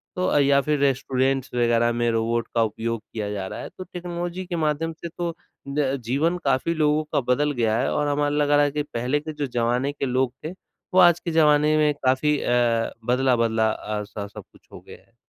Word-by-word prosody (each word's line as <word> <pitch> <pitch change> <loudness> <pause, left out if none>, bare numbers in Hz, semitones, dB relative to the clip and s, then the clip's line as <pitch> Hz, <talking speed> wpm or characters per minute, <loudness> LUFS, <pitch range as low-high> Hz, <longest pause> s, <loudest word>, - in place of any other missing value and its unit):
तो 185 -1 0
अ, - - +2
या 140 0 +4
फिर 150 +1 0
रेस्टोरेंट्स 135 -1 0
वगैरह 120 -1 +2
में 120 0 0
रोबोट 115 +1 0
का 115 - +4
उपयोग 115 +1 -3
किया 105 -2 -3
जा 100 -2 -4
रहा - - -7
है। - - -7
तो 185 - -6
टेक्नोलॉजी 175 0 -5
के 175 - -4
माध्यम 160 +2 -1
से - - -2
तो 170 -1 -2 0.3
ज 140 -1 0
जीवन 150 +9 +1
काफ़ी 135 +4 +1
लोगों 155 0 +2
का - - +3
बदल 150 +3 0
गया 115 -5 0
है 135 - 0
और 150 - 0
हमें 145 0 +1
लग 145 0 +1
रहा 145 0 +5
है 145 - +1
कि 150 +1 -2
पहले 130 0 -2
के 155 +1 -7
जो 150 -1 -3
ज़माने 120 +3 0
के 145 - -4
लोग 130 -1 0
थे 160 - -3 0.4
वो 185 - +5
आज 175 -2 +6
के 170 - -4
ज़माने 150 -1 +4
में 150 -1 +3
काफ़ी 140 +3 +2
अ, 120 -2 +1
बदला-बदला 115 -3 +2
अ, 105 -1 -4
स 100 0 -7
सब - - -9
कुछ - - -23
हो - - -9
गया - - -13
है। - - -35
140 Hz, 220 wpm, -24 LUFS, 120-150 Hz, 0.4 s, आज